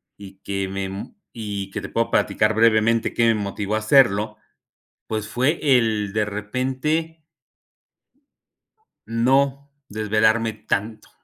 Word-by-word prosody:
y 95 -1 -13
que 100 -1 -2
me 95 0 -5 0.2
y 100 -3 -5
que - - -4
te - - -7
puedo 115 0 -1
platicar 110 +1 +2
brevemente 115 0 +3
que 115 - +3
me 115 - +5
motivó 105 0 -3
a 110 - +1
hacerlo, 110 -3 +3 0.7
pues 110 -1 -3
fue 130 +8 0 0.2
el 105 -3 -1
de 110 0 +1
repente 130 +10 -2 1.8
no 135 +5 +1 0.2
desvelarme 110 +1 +1
tanto. 105 0 -4
110 Hz, 115 wpm, -22 LUFS, 105-115 Hz, 1.8 s, me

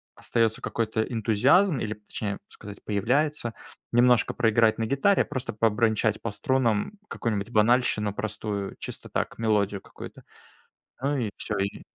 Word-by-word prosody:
остается 115 -1 0
какой-то 110 -1 -1
энтузиазм 125 - +3
или, 110 -2 -2
точнее 105 -1 -5
сказать, 100 -1 -11
появляется, 120 +5 0 0.4
немножко 120 0 +4
проиграть 115 -1 +3
на 115 - 0
гитаре, 160 - +3
а - - -14
просто 130 -4 -4
побренчать 110 0 +1
по 115 - -2
струнам 120 - 0 0.2
какую-нибудь 110 -1 -2
банальщину 110 -2 +3
простую, 105 -2 -4
чисто - - -8
так, - - -2
мелодию 105 -3 +1
какую-то. - - -11 0.8
Ну 140 +2 +1
и 115 -5 -1
всё, 110 - -4
и 100 +1 -3
110 Hz, 135 wpm, -26 LUFS, 105-125 Hz, 0.8 s, немножко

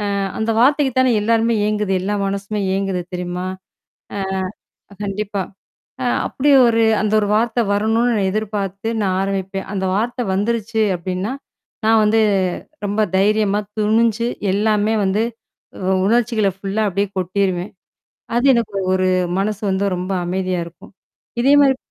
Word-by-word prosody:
அ - - -1 0.2
அந்த 220 +1 0
வார்த்தைக்கு 280 0 +3
தானே 260 -1 +4
எல்லாருமே 230 +1 +2
ஏங்குது. 210 -2 0
எல்லா 205 +3 -1
மனசுமே 200 +1 -3
ஏங்குது 195 -2 -1
தெரியுமா? 180 0 -3 1.4
ஆ. - - -13
கண்டிப்பா. 200 0 -3 0.6
அ - - -1 0.2
அப்படி 290 +2 0 0.2
ஒரு 230 -1 +3 0.2
அந்த 215 - 0
ஒரு 205 - -1
வார்த்தை 235 +1 +1
வரணும்னு 225 +4 +2
நான் 195 -2 +1
எதிர்பார்த்து 205 -1 -3
நான் 185 -1 0
ஆரம்பிப்பேன். 195 0 -3
அந்த 190 - -2
வார்த்தை 240 +3 -1
வந்துருச்சு 220 +2 0
அப்டின்னா. 185 +5 -3 0.5
நான் 225 0 +5
வந்து 220 +1 +3 0.7
ரொம்ப 205 +2 -1 0.2
தைரியமா 210 0 +2 0.2
துணிஞ்சு 225 +2 +2 0.3
எல்லாமே 210 +1 +1
வந்து 195 +3 +1 0.6
உ - - 0 0.2
உணர்ச்சிகளை 225 -2 +2
ஃபுல்லா 195 +2 -2
அப்டியே 200 +2 -1
கொட்டிருவேன். 185 0 -1 0.7
அது 240 - +1
எனக்கு 220 -4 -1 0.2
ஒரு 185 0 +1 0.3
மனசு 205 +1 -1
வந்து 190 +1 0
ரொம்ப 180 +2 -3
அமைதியா 185 0 -1
இருக்கும். 170 - -15 0.5
இதே 275 +3 +4
மாரி. 270 -2 +4
205 Hz, 135 wpm, -19 LUFS, 195-225 Hz, 1.4 s, நான்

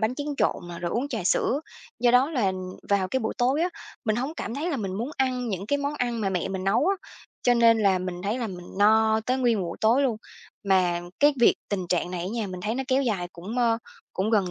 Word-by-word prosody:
bánh 220 +3 +1
tráng 290 0 -4
trộn - - +2 0.2
rồi 170 - -2
uống 250 +8 -1
trà 225 -9 -3
sữa. 270 - +2 0.4
Do 240 0 +5
đó 255 +5 +4
là 220 -11 +1 0.4
vào 195 -2 +2
cái 260 - 0
buổi 220 - -2
tối 265 +6 +2
á 355 - +2 0.4
mình 215 -2 +1
hổng 265 +6 -2
cảm 235 - -5
thấy 310 +6 -2
là 290 - -1
mình 195 -5 -3
muốn 235 +8 -3
ăn 255 -2 0
những 195 -2 -3
cái 285 +5 +1
món 285 +1 -2
ăn 240 -4 -1
mà 200 - 0
mẹ 180 -1 -1
mình 190 -1 -4
nấu 205 - +3
á, 395 - +3 0.5
cho 245 - +4
nên 230 -1 +5
là 195 -3 +3
mình 180 -1 -5
thấy 210 +6 -1
là 235 - -2
mình 180 -3 -8
no 220 +1 +4
tới 255 +1 +1
nguyên 240 -4 +2
một - - -2
buổi 170 - -5
tối 235 +6 +4
luôn. 245 -5 +1 0.5
Mà 185 -3 +2 0.2
cái 290 0 +5
việc 240 - +6
tình 190 -3 -2
trạng 180 0 0
này 180 -2 -3
á 175 - -3
nha 230 -3 -2
mình 185 -1 -6
thấy 215 +4 -2
nó 265 - -1
kéo 265 +1 +3
dài 195 -8 -1
cũng, 195 +8 -6
ơ, 230 -2 +3 0.3
cũng 195 +3 -1
gần 200 -5 +2
225 Hz, 260 wpm, -26 LUFS, 190-255 Hz, 0.5 s, việc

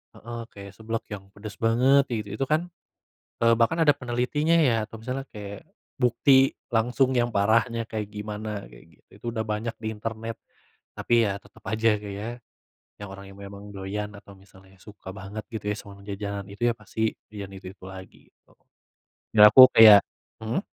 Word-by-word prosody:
Heeh, 120 +1 -8
kayak 100 -1 -10
seblak 115 +1 -4
yang 95 -1 -9
pedas 105 0 -9
banget 125 +5 +4
itu 105 -3 -3
itu, 135 - +1
kan, 155 +4 +1 0.8
eee, 115 0 +6
bahkan 120 +9 +2
ada 145 -2 +5
penelitinya, 125 +6 0
ya, 130 -8 +3
atau 115 - -10
misalnya 130 +3 -4
kayak 100 -2 -8 0.4
bukti 135 +2 +4 0.2
langsung 125 +3 +2
yang 120 -1 +2
parahnya 115 +3 +2
kayak 110 -2 -4
gimana, 105 0 -6
kayak - - -16
gitu. - - -35
Itu - - -13
udah 110 -1 -2
banyak 110 +2 -3
di 110 - -5
internet, 115 +1 -5 0.6
tapi, 120 -1 +2
ya, 100 0 -2
tetap 105 +2 -20
aja, 110 +1 +2
Kak, 105 -1 -7
ya, 105 +3 -5 0.7
yang 100 -1 -8
orang 100 0 -12
yang 100 - -15
memang 100 +1 -10
doyan 100 +2 -4
atau 100 0 -14
misalnya 95 0 -20
suka 105 -2 -12
banget, 100 +2 -7
gitu, 110 -2 -6
ya, - - -2
sama 100 -1 -12
jajanan 100 0 -5
itu, 120 +4 0
ya, - - 0
pasti 110 -2 -2 0.2
jajan 100 -2 -7
itu-itu 95 0 -11
lagi, 95 0 -13
gitu. - - -30 0.8
Ya, 105 -1 +10
aku 130 +2 +11
kayak 105 -2 +10 0.4
mhm? 115 - -2
110 Hz, 175 wpm, -25 LUFS, 100-120 Hz, 0.8 s, aku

